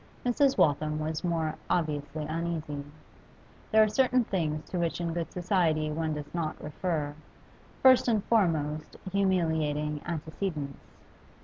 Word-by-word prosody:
Mrs. 270 +3 +3
Waltham 150 +1 +2
was 155 0 -3
more 165 -3 0 0.2
obviously 155 -2 -1
uneasy. 155 -2 -3 0.9
There 220 0 +7
are - - +3
certain 255 +3 +3
things 155 -7 -2
to 180 - -1
which 170 0 -1
in 170 -1 -2
good 170 -1 -3
society 170 -4 +1
one 160 0 -1
does 150 -1 -7
not 165 -3 -2
refer, 150 -1 -2 0.7
first 260 -1 +7
and 220 -4 +2
foremost 155 -8 +1
humiliating 160 -6 +1
antecedents. 160 -3 -4
160 Hz, 125 wpm, -29 LUFS, 150-185 Hz, 0.9 s, There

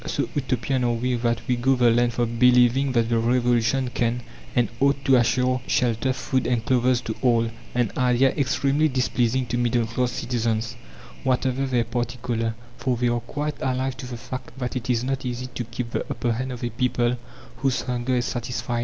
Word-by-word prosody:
So - - -1
Utopian 130 -1 -1
are 120 -1 +2
we 125 +2 -1
that 115 -1 0
we 125 - +2
go 130 +3 +2
the 120 -2 +4
length 120 0 +2
of 115 -1 -1
believing 125 +2 +5
that 115 -2 +2
the 115 -1 +2
Revolution 120 +1 +2
can 120 0 0 0.3
and 120 -2 +3
ought 140 0 +2
to 135 - +5
assure 125 +1 +2
shelter, 120 +1 +1
food, 130 0 -1
and 120 -2 0
clothes 125 -1 +2
to 110 - -3
all 115 -2 +2 0.2
an 120 -4 +1
idea 125 +1 +3
extremely 140 +2 +1
displeasing 130 -2 +1
to 120 0 -2
middle 120 -1 +2
class 120 +2 -1
citizens, 115 -1 -1 0.5
whatever 130 0 +1
their 125 -3 +2
party 120 +1 -3
colour, 115 -2 -1 0.2
for 125 -2 0
they 120 0 +1
are 120 0 +1
quite 145 +5 -4
alive 130 0 -1
to 130 - -7
the 125 -1 -6
fact 125 +2 -8
that 125 -1 -3
it 125 0 -4
is 120 -1 +2
not 135 +1 -2
easy 125 0 -3
to 120 - -3
keep 115 +1 -5
the - - -1
upper 120 - -1
hand 130 +3 -2
of 125 -1 -7
a 120 - -1
people 120 +1 +1 0.4
whose 130 -1 0
hunger 125 0 -1
is 120 0 +1
satisfied. 120 0 -3
125 Hz, 200 wpm, -24 LUFS, 120-130 Hz, 0.5 s, believing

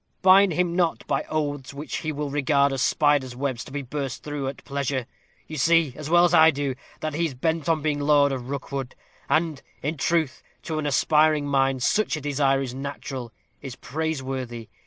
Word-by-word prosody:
Bind 190 0 +6
him 175 0 0
not 175 -3 0
by - - -1
oaths 145 -3 -3
which 145 +2 -5
he 155 - -3
will 145 -1 -4
regard 140 -1 +2
as 135 - -2
spiders' 145 -4 +2
webs, 130 -2 -2
to - - -12
be 145 0 -4
burst 135 0 -5
through 145 -2 -4
at 135 - -6
pleasure. 140 -2 -2 0.4
You 155 - -7
see, 165 0 +3
as 155 0 -7
well 175 +1 +6
as 175 - +1
I 160 -1 +8
do, 140 -3 -1 0.3
that 155 -1 -2
he 165 +3 +1
is 135 - -8
bent 160 +4 -1
on 160 -2 +1
being 150 -2 0
lord 145 -1 +4
of 130 -1 -5
Rookwood; 135 -1 -4 0.3
and, 155 -1 +1 0.2
in 150 +3 -2
truth, 160 -1 0 0.2
to 160 -2 -3
an 150 - -2
aspiring 150 +1 +3
mind, 135 -2 +1
such 215 - +1
a - - -6
desire 135 -1 +1
is 125 -2 -5
natural, 135 -2 -6 0.3
is 135 -3 -7
praiseworthy. 130 -5 -4
145 Hz, 195 wpm, -25 LUFS, 135-155 Hz, 0.4 s, I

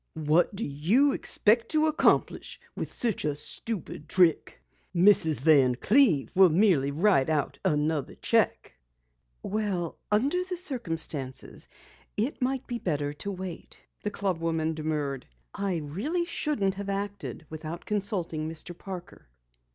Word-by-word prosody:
"What 160 +5 +2
do 220 - -3
you 185 - +2
expect 230 -2 +2
to 310 -1 +3
accomplish 315 +1 +1 0.2
by - - -3
such 230 -4 -1
a 150 -1 0
stupid 160 0 -3
trick? 175 -4 +2 0.4
Mrs. 170 -6 +5
Van 135 -6 +5
Cleve 185 - +3
will 190 -1 +6
merely 165 -5 +3
write 155 -2 +2
out 155 -2 -1
another 150 -1 0
cheque." - - +1 0.7
"Well, 195 -5 -2
under 280 +13 +2
the 365 -1 -5
circumstance, 165 - -2 0.5
it 240 +7 -2
might 260 +1 -1
be 240 -2 -4
better 145 -6 -2
to 200 +7 -5
wait," 185 -2 -8 0.2
the 210 - -2
club 195 -4 -2
woman 160 -1 -1
demurred. 150 -4 -3 0.3
"I 195 -3 -1
really 210 - -2
shouldn't 225 - -1
have 200 +1 -6
acted 200 -4 -4
without 160 +2 -7
consulting 185 -7 -2
Mr. 165 +2 -6
Parker." 180 - -9
180 Hz, 130 wpm, -28 LUFS, 155-215 Hz, 0.7 s, will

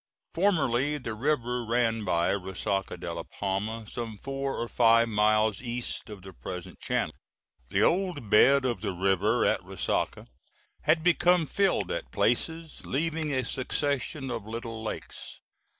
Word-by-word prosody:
Formerly 150 -7 +2
the 115 -5 -5
river 125 0 0
ran 115 -1 +1
by 85 -3 +2
Resaca 95 0 -2
de - - -4
la - - -4
Palma, 105 +3 -3
some 110 0 -6
four 135 +3 -3
or 120 - -2
five 115 -1 +4
miles 105 0 +3
east 120 -2 -4
of 100 -3 -9
the 95 -1 -10
present 90 -1 -7
channel. - - -1 0.6
The - - +2
old 180 - +1
bed 135 +5 +6
of 120 -7 -1
the - - -2
river 95 +5 +2
at - - +2
Resaca - - -2 0.6
had 160 +1 +3
become 175 -1 +4
filled 195 - +1
at - - -4
places, 165 -1 0
leaving 160 +2 -1
a 130 -3 0
succession 135 +1 -2
of 115 -3 -3
little 115 0 -5
lakes. 110 - -6
120 Hz, 145 wpm, -28 LUFS, 110-145 Hz, 0.6 s, bed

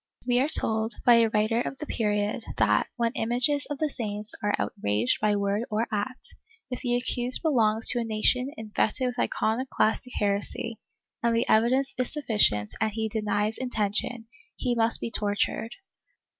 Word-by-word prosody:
We 245 0 +2
are 275 +4 +1
told, 220 -5 +1
by 240 -2 +7
a 230 -1 +4
writer 220 +2 +1
of 270 - -4
the 300 - -6
period, 210 -2 -1
that, - - +3
when 235 -1 0
images 250 +5 0
of 290 - -4
the 310 - 0
saints 210 -3 -1
are 205 0 +1
outraged 110 - 0
by 210 -1 +2
word 200 +1 0
or 220 +1 0
act, 215 +5 -4 0.4
if 250 - -4
the 245 -1 0
accused 245 +2 +1
belongs 225 -7 +3
to 245 - +2
a - - -1
nation 230 +4 +1
infected 220 +3 -1
with 245 -1 -3
iconoclastic 245 +1 0
heresy, 205 +2 -1 0.4
and 235 0 +1
the 230 - +1
evidence 255 +5 +2
is 255 - -1
sufficient 210 - +1
and 220 -1 +1
he 220 0 -2
denies 210 0 -1
intention, 225 -1 -1 0.3
he 250 -2 -1
must 230 -1 +1
be 230 - -4
tor 205 -2 0
tured. 225 - -1
225 Hz, 170 wpm, -27 LUFS, 210-245 Hz, 0.4 s, by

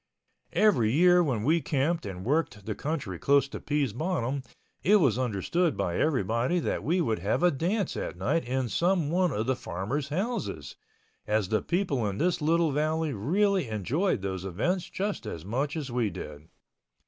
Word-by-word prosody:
Every 155 - +4
year 180 +5 +5
when 125 -9 -1
we 160 +6 +3
camped 145 0 0
and 95 -1 -7
worked 130 -8 0
the 110 - -2
country 130 - -4
close 140 -1 +3
to - - -6
Pease 145 -6 -1
Bottom 140 - -1 0.4
it 205 - +4
was 135 - +3
understood 130 - 0
by 85 - -1
everybody 130 - +1
that 170 - -1
we 175 +4 +1
would 110 - 0
have 100 - 0
a 180 - +5
dance 180 +7 -1
at - - -4
night 95 - 0
in 130 +1 -1
some 170 - +1
one 180 +1 +2
of 110 -3 -1
the 130 +1 +1
farmers' 125 - -3
houses, 185 - -3 0.5
as 105 -3 +1
the 110 - +1
people 170 - 0
in 100 - -5
this 175 +3 +1
little 165 +1 +2
valley 155 +1 0
really 185 - +1
enjoyed 110 - -1
those 95 -2 -3
events 140 - -1
just 200 +1 -3
as 85 0 -6
much 135 - -2
as 140 -5 -4
we 120 -3 +1
did. 75 -3 -8
140 Hz, 175 wpm, -28 LUFS, 110-170 Hz, 0.5 s, year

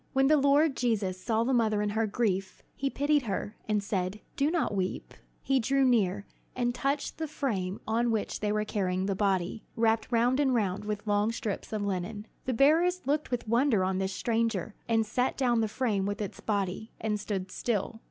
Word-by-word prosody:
When 270 0 +4
the 305 +3 +5
Lord 285 +1 +4
Jesus 200 -6 0
saw 225 0 +1
the 260 +3 +1
mother 220 -3 +2
in 210 0 0
her 220 +1 +1
grief, 195 -3 -1
he 275 - -1
pitied 290 +2 +2
her, 205 +1 -3
and 210 -1 +1
said, 190 0 -2 0.2
"Do 280 +2 +2
not 330 -9 0
weep." 190 -2 -3 0.3
He 270 -1 +2
drew 270 +3 +2
near, 205 -5 +2 0.3
and 245 -1 0
touched 275 +5 -2
the 320 - -2
frame 205 -11 -2
on 235 +2 +1
which 220 -2 -1
they 210 -1 0
were 210 0 0
carrying 185 -3 -1
the 195 - 0
body, 190 +1 0
wrapped 225 0 +1
round 245 +3 +3
and 265 -3 +3
round 205 -2 0
with 210 0 -3
long 205 +1 +2
strips 230 -3 -4
of 215 -2 -2
linen. 200 +2 -3 0.2
The 255 - 0
bearers 330 +6 +3
looked 295 +3 0
with 245 -3 -3
wonder 235 -3 +3
on 185 0 0
this 190 0 -1
stranger, 225 -1 -1 0.2
and 225 -1 +3
set 250 +4 0
down 245 -3 +2
the 220 - +1
frame 210 -4 0
with 205 +1 -3
its 205 -3 -5
body, 205 +1 -2
and 210 -1 -1
stood 195 -3 -4
still. 225 -1 -2
220 Hz, 200 wpm, -29 LUFS, 200-255 Hz, 0.3 s, the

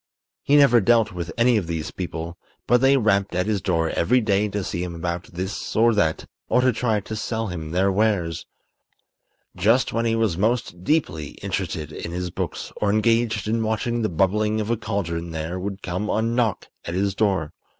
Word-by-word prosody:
He 145 - +2
never 135 -5 +6
dealt 115 0 +3
with 90 -2 -5
any 120 0 +4
of 95 -6 -2
these 80 -2 -3
people; 85 -1 -5 0.3
but 125 +1 +3
they 135 +1 +5
rapped 100 -6 +1
at 90 - +1
his 105 -3 0
door 85 -3 0
every 125 +9 +2
day 105 -2 +1
to 100 0 -3
see 85 - -3
him 90 -1 -4
about 85 +2 -3
this 95 +3 -5
or 115 +2 +5
that 80 -7 +1 0.2
or 125 - +4
to 130 -1 +3
try 110 -2 0
to 110 - -6
sell 110 +1 -2
him 80 -3 -5
their 95 +4 +2
wares. 95 -5 0 1.1
Just 115 +5 +2
when 115 0 0
he 115 -1 +2
was 110 -7 0
most 110 -5 0
deeply 85 - -1
interested 75 -1 -3
in 85 - -6
his 90 0 -3
books - - -5
or 105 - 0
engaged 110 0 +2
in 115 +1 0
watching 115 +2 -1
the 110 - 0
bubbling 105 +5 +1
of 110 +1 -2
a - - +3
cauldron 85 -6 -3
there 80 +3 -4
would 100 +1 -5
come 90 +4 -3
a - - +1
knock 115 -3 0
at 85 - -5
his 100 +1 +1
door. 95 -7 0
100 Hz, 195 wpm, -23 LUFS, 90-115 Hz, 1.1 s, never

